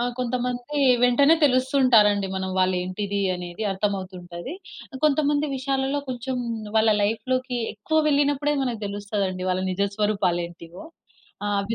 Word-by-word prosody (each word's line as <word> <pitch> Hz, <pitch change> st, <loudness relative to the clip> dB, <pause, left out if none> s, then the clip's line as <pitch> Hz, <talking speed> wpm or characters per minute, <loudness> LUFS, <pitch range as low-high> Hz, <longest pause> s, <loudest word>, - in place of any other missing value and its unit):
ఆ!కొంతమంది 245 Hz, +3 st, -2 dB, 0.3 s
వెంటనే 280 Hz, +6 st, +5 dB
తెలుస్తు 260 Hz, -1 st, +2 dB
ఉంటారండి. 210 Hz, -5 st, +5 dB
మనం 190 Hz, 0 st, -3 dB
వాళ్ళు 185 Hz, 0 st, +2 dB
ఏంటిది 200 Hz, +2 st, -3 dB, 0.2 s
అనేది 180 Hz, +4 st, -6 dB
అర్థమవుతుంటది. 190 Hz, -, -4 dB, 0.5 s
కొంతమంది 295 Hz, 0 st, +2 dB
విషయాలలో, 270 Hz, +1 st, -1 dB
కొంచెం 255 Hz, +1 st, -4 dB, 0.4 s
వాళ్ళ 220 Hz, 0 st, +4 dB
లైఫ్‌లోకి 250 Hz, +4 st, -1 dB, 0.2 s
ఎక్కువ 315 Hz, +10 st, -1 dB
వెళ్ళినప్పుడే 290 Hz, +1 st, +2 dB
మనకు 240 Hz, -4 st, -3 dB
తెలుస్తదండి 200 Hz, -2 st, -3 dB
వాళ్ళ 185 Hz, 0 st, 0 dB
నిజస్వరూపాలు 200 Hz, -2 st, 0 dB
ఏంటివో. 170 Hz, -, -12 dB, 0.6 s
ఆ! -, -, 0 dB
అవి 200 Hz, +3 st, -2 dB
220 Hz, 120 wpm, -24 LUFS, 195-260 Hz, 0.6 s, వెంటనే